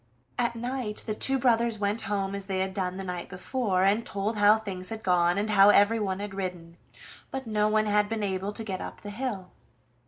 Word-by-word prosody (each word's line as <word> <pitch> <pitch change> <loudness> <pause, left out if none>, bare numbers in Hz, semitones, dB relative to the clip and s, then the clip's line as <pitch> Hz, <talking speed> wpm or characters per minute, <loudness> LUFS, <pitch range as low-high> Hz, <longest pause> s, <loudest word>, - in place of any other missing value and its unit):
At 235 -1 +1
night 240 -2 -4
the 215 - -2
two 270 +5 +2
brothers 235 -3 +2
went 205 +2 -1
home 195 -1 -1
as 200 -1 -5
they 190 -1 -2
had 190 0 -2
done 185 -1 -2
the 195 - -4
night 180 -2 -5
before, 190 0 -1
and 205 +4 +3
told 205 +2 -2
how 205 +1 +6
things 190 -4 -5
had 220 -1 -6
gone, 175 0 +3
and 210 +1 0
how 200 -1 +7
everyone 205 -2 +3
had 205 -1 -5
ridden, 180 -3 -5 0.5
but 265 0 -5
no 210 -1 +1
one 215 0 +2
had 210 0 +2
been 225 -2 -2
able 195 0 -2
to 225 - -5
get 190 -4 -4
up - - -8
the 205 - -7
hill. 205 -5 -4
205 Hz, 215 wpm, -27 LUFS, 190-220 Hz, 0.5 s, how